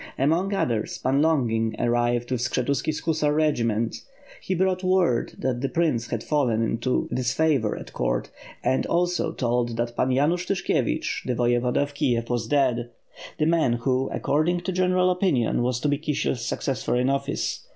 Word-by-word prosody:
Among 165 +8 +1
others. 120 - -1
Pan 135 +2 +1
Longin 115 -8 +1
arrived 120 +1 0
with 125 -2 0
Skshetuski's 130 +4 -1
hussar 155 -2 +1
regiment. 115 -8 +1 0.4
He 185 - -2
brought 185 +1 +1
word 185 -9 +2
that 125 -2 -2
the 135 - -1
prince 155 -9 0
had 115 -2 -3
fallen 125 -7 +1
into 115 +3 0
disfavor 130 -2 +1
at - - -10
court, - - -1 0.3
and 130 - +1
also 175 0 0
told 120 -2 -1
that 120 0 -2
Pan 125 - +1
Yanush 155 +8 +1
Tyshkievich, 195 - -1
the 125 - -1
Voyevoda 120 +2 +1
of 145 0 -7
Kiev 120 -4 0
were 120 - +1
dead, 125 -4 +1 0.5
the 155 - +1
man 160 -6 +2
who, 130 +2 0
according 165 +5 0
to 190 - -3
general 185 0 +2
opinion, 175 - +1
was 125 0 0
to - - 0
be 145 -1 +1
Kisiel's 145 -5 -1
successor 135 0 -2
in 125 +1 +2
office. 140 +1 -2
130 Hz, 160 wpm, -25 LUFS, 120-160 Hz, 0.5 s, word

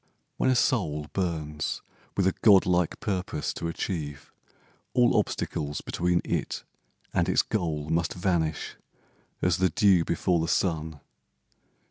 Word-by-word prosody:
When - - +2
a 130 - +4
soul 80 - +1
Burns 80 -5 -2 0.3
with 95 - +3
a 95 - +3
god 100 -4 +7
like 90 -2 +1
purpose 95 - -2
to 85 - -4
achieve, 75 -4 -4 0.6
All 125 -1 +4
obstacles 75 -8 -1
between 90 0 0
it - - -2 0.5
and - - +2
its - - +4
goal 80 -8 -2
Must 85 +1 0
vanish 85 -4 -1 0.7
as 90 -2 +3
the 95 0 +3
dew 95 0 +4
before 85 +1 +1
the 80 - -1
sun. 80 -4 -1
85 Hz, 130 wpm, -27 LUFS, 80-95 Hz, 0.7 s, god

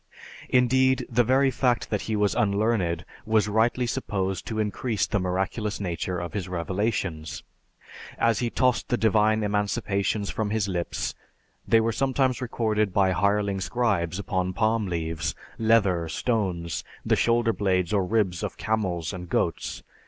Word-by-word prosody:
Indeed, 130 +1 +3
the 120 +1 +4
very 135 +3 +3
fact 125 -1 0
that 105 - 0
he 110 - +1
was 105 -1 +2
unlearned 100 -4 +1 0.2
was 110 -1 +2
rightly 115 +4 +2
supposed 100 -6 -2
to 110 - -3
increase 105 0 0
the 105 - -1
miraculous 95 +4 -2
nature 90 -1 -3
of 85 -2 -5
his 95 -3 -3
revelations. 90 -2 -2 0.7
As 115 -1 +2
he 120 - 0
tossed 125 0 +1
the 120 - +2
divine 110 0 +3
emanations 105 0 0
from 110 -2 -2
his 105 -1 0
lips, 90 -3 -2 0.5
they 115 - +5
were 115 +1 +1
sometimes 130 0 +1
recorded 110 -4 0
by 95 -2 +4
hireling 100 +1 +1
scribes 95 -4 0
upon 95 -2 -1
palm 110 0 +1
leaves, 80 -2 -2 0.2
leather, 100 -7 +3
stones, 90 - -1 0.2
the - - +3
shoulder 115 -1 +2
blades 95 -3 0
or 100 -2 +3
ribs 95 -3 0
of - - -4
camels 95 -7 -1
and 90 -2 -7
goats. - - -1
105 Hz, 145 wpm, -26 LUFS, 95-115 Hz, 0.7 s, they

